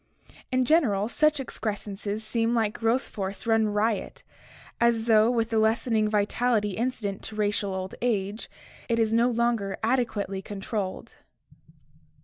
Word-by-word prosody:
In 255 Hz, 0 st, +2 dB
general, 235 Hz, -10 st, +3 dB
such 305 Hz, +5 st, +2 dB
excrescences 210 Hz, -3 st, -4 dB
seem 230 Hz, +2 st, 0 dB
like 220 Hz, -2 st, +1 dB
growth 235 Hz, +3 st, +1 dB
force 195 Hz, -1 st, -5 dB
run 225 Hz, -1 st, +3 dB
riot, 210 Hz, +1 st, -1 dB, 0.6 s
as 235 Hz, -1 st, +2 dB
though 220 Hz, -1 st, +5 dB
with 230 Hz, -2 st, 0 dB
the 225 Hz, -, +2 dB
lessening 220 Hz, 0 st, +2 dB
vi 210 Hz, -1 st, +2 dB
tality 215 Hz, -3 st, 0 dB
incident 220 Hz, -5 st, -2 dB
to 215 Hz, -, -7 dB
racial 205 Hz, -2 st, 0 dB
old 185 Hz, 0 st, -4 dB
age, 215 Hz, -3 st, -1 dB, 0.4 s
it 230 Hz, -, +2 dB
is 225 Hz, -1 st, +2 dB
no 235 Hz, +2 st, +4 dB
longer 235 Hz, -4 st, 0 dB
adequately 220 Hz, -5 st, 0 dB
con 205 Hz, 0 st, -7 dB
trolled. 195 Hz, -1 st, -4 dB
220 Hz, 140 wpm, -26 LUFS, 205-235 Hz, 0.6 s, though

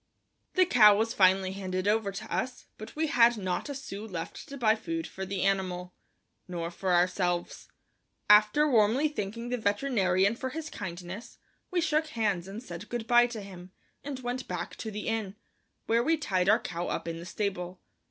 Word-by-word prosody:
The 370 Hz, -1 st, +5 dB
cow 215 Hz, -, +7 dB
was 225 Hz, +1 st, 0 dB
finally 190 Hz, 0 st, +4 dB
handed 185 Hz, -1 st, -3 dB
over 210 Hz, -1 st, +2 dB
to 215 Hz, +3 st, -5 dB
us, 255 Hz, 0 st, -3 dB
but 215 Hz, -, -9 dB
we 315 Hz, +1 st, +1 dB
had 240 Hz, -5 st, +4 dB
not 185 Hz, +6 st, -2 dB
a 285 Hz, -, -4 dB
sou 210 Hz, -6 st, -7 dB
left 170 Hz, -5 st, -6 dB
to 280 Hz, -, -7 dB
buy 220 Hz, -4 st, +4 dB
food 330 Hz, +9 st, -4 dB
for 190 Hz, 0 st, -6 dB
the 190 Hz, -1 st, -2 dB
animal, 185 Hz, -2 st, -1 dB, 0.5 s
nor 170 Hz, -2 st, -4 dB
for 180 Hz, +1 st, 0 dB
ourselves. 175 Hz, 0 st, 0 dB, 0.6 s
After 210 Hz, +8 st, +6 dB
warmly 240 Hz, +3 st, +4 dB
thanking 230 Hz, -2 st, -5 dB
the 250 Hz, 0 st, -1 dB
veterinarian 205 Hz, -3 st, +2 dB
for 260 Hz, +2 st, -4 dB
his 315 Hz, +3 st, -6 dB
kindness, 185 Hz, +4 st, -7 dB, 0.3 s
we 360 Hz, -2 st, +1 dB
shook 310 Hz, 0 st, +1 dB
hands 205 Hz, -, -1 dB
and 205 Hz, +5 st, -7 dB
said 180 Hz, -2 st, -8 dB
good 240 Hz, -2 st, -3 dB
by 240 Hz, +1 st, +5 dB
to 235 Hz, -3 st, -6 dB
him, 185 Hz, -2 st, -11 dB, 0.3 s
and 280 Hz, -2 st, -5 dB
went 250 Hz, +1 st, -4 dB
back -, -, -4 dB
to 220 Hz, -, -5 dB
the 210 Hz, 0 st, -5 dB
inn, 220 Hz, -3 st, -2 dB, 0.5 s
where 230 Hz, +1 st, +3 dB
we 320 Hz, +6 st, +2 dB
tied 195 Hz, -11 st, 0 dB
our 215 Hz, -, +6 dB
cow 175 Hz, -4 st, -4 dB
up -, -, -3 dB
in 165 Hz, 0 st, -4 dB
the -, -, -8 dB
stable. 185 Hz, -2 st, -3 dB
210 Hz, 185 wpm, -29 LUFS, 185-240 Hz, 0.6 s, cow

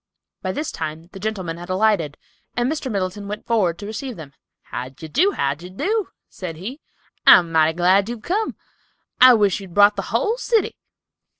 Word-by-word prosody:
By 185 Hz, -, -2 dB
this 300 Hz, +10 st, -3 dB
time 160 Hz, +2 st, -6 dB
the 195 Hz, -, -10 dB
gentlemen 190 Hz, -5 st, -3 dB
had 175 Hz, +1 st, -9 dB
alighted, 185 Hz, -6 st, +1 dB, 0.4 s
and 240 Hz, 0 st, +2 dB
Mr. 285 Hz, -3 st, -3 dB
Middleton 200 Hz, 0 st, -3 dB
went 210 Hz, +1 st, -6 dB
forward 195 Hz, -8 st, +1 dB
to 205 Hz, -, -8 dB
receive 220 Hz, +4 st, -5 dB
them. 150 Hz, -5 st, -11 dB, 0.3 s
"How 125 Hz, +1 st, -6 dB
d'ye 135 Hz, +4 st, -11 dB
do, 375 Hz, -, +2 dB
how 140 Hz, 0 st, 0 dB
d'ye 170 Hz, +5 st, -11 dB
do?" 405 Hz, -, -1 dB, 0.2 s
said 180 Hz, -4 st, -7 dB
he; 225 Hz, -, -7 dB, 0.5 s
"I'm 170 Hz, -2 st, +8 dB
mighty 160 Hz, 0 st, +3 dB
glad 190 Hz, +4 st, +3 dB
you've 235 Hz, -2 st, -6 dB
come. 425 Hz, +5 st, -1 dB, 0.7 s
I 255 Hz, -1 st, +9 dB
wish 205 Hz, -4 st, +2 dB
you'd 190 Hz, -4 st, -11 dB
brought 205 Hz, 0 st, +6 dB
the -, -, 0 dB
whole 425 Hz, -, +1 dB
city." 460 Hz, -3 st, +1 dB
200 Hz, 185 wpm, -21 LUFS, 170-235 Hz, 0.7 s, I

